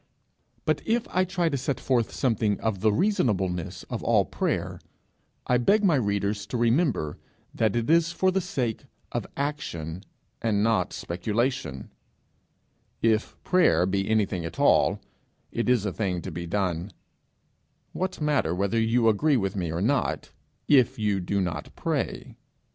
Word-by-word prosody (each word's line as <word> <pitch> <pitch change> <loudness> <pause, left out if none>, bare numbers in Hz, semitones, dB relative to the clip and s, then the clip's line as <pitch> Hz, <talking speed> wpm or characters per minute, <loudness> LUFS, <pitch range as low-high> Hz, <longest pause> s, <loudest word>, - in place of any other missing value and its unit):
But - - +1
if 230 +1 0
I 185 +1 +2
try 180 -2 0
to 145 -4 0
set 130 +1 -2
forth 120 -4 +1
something 110 -5 0
of 110 -4 -1
the 110 +2 +3
reasonableness 100 - 0
of - - -5
all - - +3
prayer, - - -2 0.7
I 125 -1 +2
beg 205 - +3
my 185 -5 +4
readers 100 -4 0
to 125 - -3
remember 115 - +1 0.3
that 110 -2 +1
it 115 -1 0
is 165 +1 +4
for 185 +2 +2
the 190 +1 +1
sake 125 - -3 0.3
of - - -3
action 95 - -4 0.4
and 105 -3 +1
not 115 0 +2
speculation; 105 - -2 1.1
if 110 -1 +1
prayer 180 - +4
be 95 +1 -1
anything 100 -5 +1
at 80 - -6
all, - - +4 0.5
it 120 +1 -1
is 120 -5 +3
a 100 - -2
thing 90 -5 -2
to 95 - -5
be 85 +1 -5
done: 90 0 -1 1.0
what 185 0 -3
matter 145 - +1
whether 100 +4 0
you 115 +1 +2
agree 135 +7 +3
with 95 -3 -1
me 90 -4 -2
or 85 +3 -2
not, 135 +1 0 0.4
if 130 -5 +4
you 105 -2 0
do 95 +2 -1
not 85 -6 -3
pray? - - -3
110 Hz, 155 wpm, -26 LUFS, 95-140 Hz, 1.1 s, my